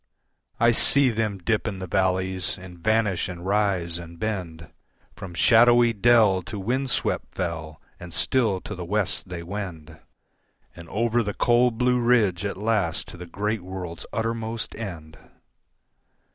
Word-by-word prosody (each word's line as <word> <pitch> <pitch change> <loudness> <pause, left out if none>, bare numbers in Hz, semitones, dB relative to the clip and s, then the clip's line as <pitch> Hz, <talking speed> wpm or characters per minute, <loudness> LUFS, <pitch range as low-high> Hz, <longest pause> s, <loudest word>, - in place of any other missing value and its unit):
I 120 +1 +5
see 135 +3 +4
them 110 -2 -1
dip 110 +4 -1
in 100 -3 -3
the 95 - -5
valleys 95 +1 0
and 90 -2 -12
vanish 110 -2 +1
and 90 -1 -8
rise 95 -4 0
and 85 0 -10
bend 85 -7 -4 0.4
From 95 -4 -9
shadowy 120 +3 +5
dell 110 -3 +4
to 105 +5 -7
windswept 125 +6 -1
fell, 80 -4 -4 0.2
and 90 0 -9
still 105 0 +1
to - - -7
the 90 -3 -6
West 95 0 -1
they 85 -2 -6
wend, 85 -4 -7 0.8
And 85 -1 -11
over 115 +4 +1
the 105 -2 -3
cold 120 -1 +3
blue 125 0 +2
ridge 110 -7 +2
at 100 - -3
last 105 -5 0
to - - -10
the 90 0 -9
great 105 +4 -2
world's 90 -2 -7
uttermost 115 0 -3
end. 85 -8 -8
100 Hz, 145 wpm, -25 LUFS, 90-115 Hz, 0.8 s, I